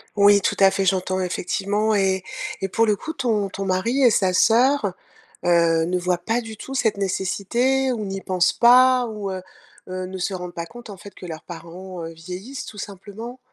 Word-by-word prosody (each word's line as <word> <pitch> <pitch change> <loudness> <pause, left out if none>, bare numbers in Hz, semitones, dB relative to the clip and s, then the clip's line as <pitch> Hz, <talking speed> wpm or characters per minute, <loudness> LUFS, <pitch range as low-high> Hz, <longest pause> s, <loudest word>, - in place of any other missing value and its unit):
Oui, 200 0 +6
tout - - 0
à 195 -1 +6
fait, 195 - 0
j'entends 185 0 +1
effectivement 200 +4 -1
et 190 -2 +1 0.4
et 195 - 0
pour 225 +4 +2
le 210 -1 +2
coup, 320 +9 -6
ton 220 -7 0
ton 195 0 -5
mari 230 +9 0
et 245 - +7
sa 190 -3 +2
soeur, 230 -1 +3 0.5
heu, 165 -2 +3
ne 180 +1 0
voient 180 0 0
pas 225 +7 -1
du 220 -2 -9
tout 270 - -8
cette 225 -6 +1
nécessité 235 +7 0
ou 215 -4 -3
n'y 195 0 -4
pensent 185 -2 +1
pas, 250 +1 +6
ou 210 -3 -5
heu 185 -1 -4 0.5
heu, 185 0 -4
ne 190 0 -6
se 190 +2 -2
rendent 180 -1 -6
pas 170 0 -5
compte, 240 +1 -12
en 200 - -8
fait, 200 +3 -12
que - - -11
leurs 160 -1 -7
parents, 175 +2 -9
heu, 165 - -7
vieillissent 185 +11 -7
tout 210 - -10
simplement? 210 +6 -8
195 Hz, 205 wpm, -22 LUFS, 185-230 Hz, 0.5 s, et